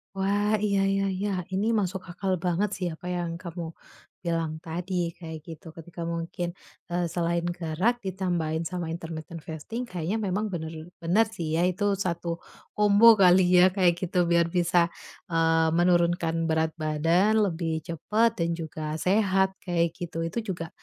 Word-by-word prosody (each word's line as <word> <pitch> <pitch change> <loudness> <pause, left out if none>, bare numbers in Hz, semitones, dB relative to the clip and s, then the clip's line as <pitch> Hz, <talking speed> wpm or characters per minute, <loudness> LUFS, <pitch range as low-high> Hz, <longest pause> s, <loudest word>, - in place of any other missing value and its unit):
Wah, 205 +2 +1
iya 200 -2 +2
iya 195 0 +1
iya. 200 +3 -2 0.2
Ini 200 +3 +1
masuk 190 -1 -2
akal 185 +1 -2
banget 180 +4 +1
sih 185 - -3
apa 175 +3 -8
yang 175 -1 -2
kamu 170 -2 -6 0.5
bilang 165 -2 -1
tadi 175 +1 -2
kayak 160 -2 -7
gitu. 165 0 -10
Ketika 170 +1 -9
mungkin, 170 +1 -3 0.4
eee, 175 0 -1
selain 170 0 0 0.2
gerak 180 +8 0
ditambahin 175 -4 -1
sama 175 0 -4
intermittent 165 -1 -7
fasting, 160 +11 -5
kayaknya 180 +2 -2
memang 205 +2 -1
bener 160 -2 -3 0.3
bener 180 +7 +3
sih 160 -4 -2
ya 175 - +3
itu 200 +2 0
satu 170 -2 -2 0.4
kombo 210 +2 +7
kali 185 0 +7
ya 180 +1 +8
kayak 180 -3 +4
gitu, 180 -1 +1
biar 170 -1 +4
bisa, 175 -1 +3 0.5
eee, 165 0 +3
menurunkan 170 -1 +2
berat 160 0 +1
badan 165 +7 +2 0.2
lebih 165 -1 -2
cepet 215 +8 +1
dan 170 0 +1
juga 155 -2 -5
sehat 190 -1 +2
kayak 170 -2 +1
gitu. 165 -1 -4
Itu 165 +8 -2
juga, 170 -5 -4
175 Hz, 155 wpm, -27 LUFS, 165-190 Hz, 0.5 s, ya